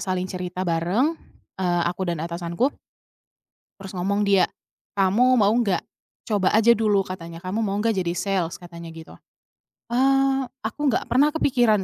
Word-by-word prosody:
saling 185 -1 -2
cerita 180 0 -4
bareng, 175 - +1 0.5
eee, 175 -2 +1
aku 180 +2 -4
dan 170 -3 -2
atasanku 170 +10 -1 1.1
terus 195 0 -8
ngomong 200 +3 0
dia, 195 -2 +5 0.5
"Kamu 215 +7 +4
mau 205 0 +4
nggak? 215 -7 +1 0.5
Coba 200 -3 +2
aja 225 +2 +6
dulu," 210 -3 +2
katanya, 170 -2 -7
"kamu 185 +5 -3
mau 200 -1 -1
nggak 225 +1 +1
jadi 175 -2 0
sales?" 185 -3 -1
Katanya 170 -1 -10
gitu. 160 0 -11 0.8
Eee, 270 +2 +3 0.2
aku 220 +5 -5
nggak - - -1
pernah 290 +4 +3
kepikiran 245 -9 +2
195 Hz, 145 wpm, -23 LUFS, 175-230 Hz, 1.1 s, aja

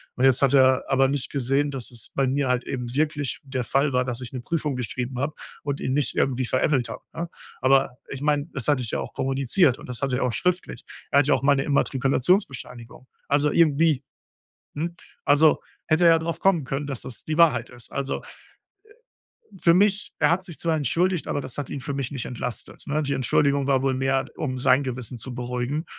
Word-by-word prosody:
Und 130 - +2
jetzt 135 -1 +4
hat 140 -1 +4
er 130 -1 +5
aber 135 0 +4
nicht 135 -1 -2
gesehen, 140 +2 +1
dass 130 -4 -5
es 115 -3 -5
bei 135 - +2
mir 135 +1 0
halt 125 0 +1
eben 125 -3 -4
wirklich 150 -2 -1
der 130 -2 -3
Fall 135 +3 +1
war, 125 - +3
dass 125 -1 -4
ich 125 - -7
'ne 125 - -4
Prüfung 150 +1 -2
geschrieben 125 +1 -4
habe 145 +3 -1 0.3
und 140 -1 -3
ihn 130 - -1
nicht 145 -1 0
irgendwie 130 -1 +1
veräppelt 130 0 +1
habe, - - -8
ne? 170 +1 -4 0.3
Aber 135 -1 +3
ich 140 0 -6
meine, 145 0 +1
das 135 -6 -4
hatte 145 -4 +3
ich 115 - -3
ja - - -1
auch - - -6
kommuniziert 135 +2 +2
und - - -12
das 125 -2 -6
hatte 135 -2 0
er - - 0
auch 125 -2 0
schriftlich. 180 0 -1 0.3
Er 140 - +5
hatte 145 - +2
ja - - +6
auch 130 - -4
meine 140 -1 +3
Immatrikulationsbescheinigung. 135 - 0 0.2
Also, 145 +1 +2
irgendwie, 155 -3 +3 0.7
hm, 170 +3 -3 0.3
also, 150 +2 +5 0.3
hätte 170 +2 +3
er 165 -1 +7
darauf 165 +1 -3
kommen 185 -6 +3
können, 135 +2 -3
dass 135 -4 -4
das 125 - -7
die 155 0 -1
Wahrheit 130 -8 +4
ist. 120 -2 -11
Also, 140 0 -3 1.1
äh, 205 - -20
für 170 0 +5
mich 200 +2 +2
er 150 - +4
hat 185 +2 +1
sich 170 -5 -9
zwar 165 -2 0
entschuldigt, 170 +5 0
aber - - -1
das 130 0 -7
hat 145 - -3
ihn 140 - -4
für 140 0 -4
mich 140 -1 -3
nicht 130 -5 -4
entlastet, 125 -1 -6
ne? 150 +2 0
Die 140 -1 -2
Entschuldigung 140 +2 +2
war 135 -1 +2
wohl 135 -1 +1
mehr, 135 0 0
um 130 -4 -3
sein 130 +2 +4
Gewissen 125 -2 -5
zu 125 +2 -7
beruhigen. 125 +5 -3
135 Hz, 215 wpm, -24 LUFS, 130-150 Hz, 1.1 s, er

